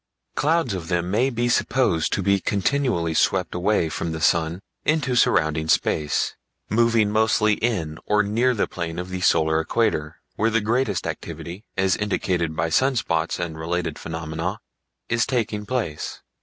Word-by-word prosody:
Clouds 155 -6 +1
of 90 -3 -5
them 90 0 -1
may 120 +6 +2
be 120 -1 -1
supposed 120 -9 +1
to 100 - 0
be 100 +1 +3
continually 100 -5 0
swept 90 +2 +1
away 90 0 +1
from 80 +1 -3
the 80 - -4
sun 80 +1 +2 0.2
into 150 -5 +1
surrounding 80 -8 +2
space, 75 -1 +1 0.4
moving 115 -1 +3
mostly 110 0 +3
in 90 -9 -2
or 105 0 +3
near 120 +5 +1
the 105 - +1
plane 85 -2 -5
of 90 +1 -4
the 90 0 -4
solar 80 -2 +3
equator, 80 -3 0 0.2
where 110 - +2
the 115 0 +2
greatest 110 - 0
activity, 90 +5 -6
as 95 -1 +3
indicated 90 -5 -1
by 80 - 0
sunspots 95 -6 +1
and 80 -2 -4
related 85 -1 -2
phenomena, 80 +5 -4 0.5
is 115 0 +1
taking 110 -4 -1
place. 115 -12 -3
95 Hz, 155 wpm, -23 LUFS, 80-115 Hz, 0.5 s, be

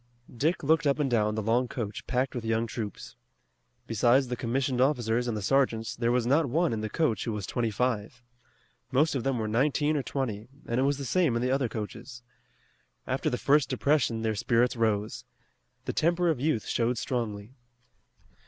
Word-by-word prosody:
Dick 160 +8 0
looked 160 +1 +3
up 140 - +2
and 145 -4 0
down 105 -2 +2
the 110 - -2
long 120 +4 +2
coach 110 -5 -5
packed 130 +1 0
with 120 - -4
young 115 0 0
troops. 110 -2 -6 0.7
Besides 120 +4 +3
the 125 - -1
commissioned 125 +2 -1
officers 125 -3 +1
and 115 -3 -1
the 105 - -4
sergeants, 115 -3 +1
there 120 0 0
was 125 -1 +1
not 140 +5 +3
one 165 +2 +1
in 110 - -2
the 110 - -3
coach 115 - 0
who 115 - -2
was 105 -2 -4
twenty 120 -2 -1
five. 120 +1 -2 0.7
Most 150 +5 +3
of 130 -4 -2
them 135 -2 0
were 110 -1 -2
nineteen 145 +6 +1
or 145 - +1
twenty, 120 -6 -3 0.2
and 120 +2 -1
it - - +3
was 140 0 +1
the 140 - -5
same 160 -1 +2
in 120 - 0
the 125 - +1
other 135 -3 +1
coaches. 115 +3 -7 0.8
After - - -1
the - - -1
first 145 0 +3
depression 130 -6 +1
their 110 -1 +1
spirits 115 +3 +1
rose. 110 -2 -1 0.6
The - - -2
temper 175 +2 +2
of 150 - -3
youth 140 -7 0
showed 120 +1 0
strongly. 110 -2 -3
120 Hz, 190 wpm, -28 LUFS, 115-135 Hz, 0.8 s, looked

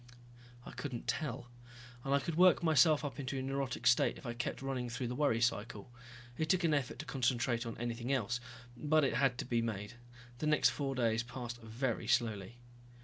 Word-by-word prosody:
I - - -8
couldn't 130 -5 -6
tell. 130 -4 -3 0.5
And 135 - -3
I 140 - +4
could 160 +5 -3
work 180 +2 +5
myself 155 -1 +5
into 135 0 -3
a - - -1
neurotic 135 -2 -3
state 125 0 +4
if - - -13
I 120 - -3
kept 120 +2 -4
running 130 -3 -2
through 120 +1 -3
the 125 - -3
worry 140 -5 +2
cycle. 115 -1 -1 0.5
It 160 -1 0
took 180 +1 +3
an 165 -2 +3
effort 140 -2 -1
to 155 - -6
concentrate 120 -2 0
on 115 - -6
anything 120 +2 -3
else, 120 -2 0 0.4
but 155 +4 +2
it 135 - +2
had 125 0 +2
to - - -3
be 120 -2 +1
made. 105 -2 -4 0.5
The 155 - -1
next 150 0 +4
four 135 -2 -2
days 115 -2 +2
passed 120 -1 -7
very 115 0 -2
slowly. 115 -3 0
125 Hz, 195 wpm, -34 LUFS, 120-140 Hz, 0.5 s, work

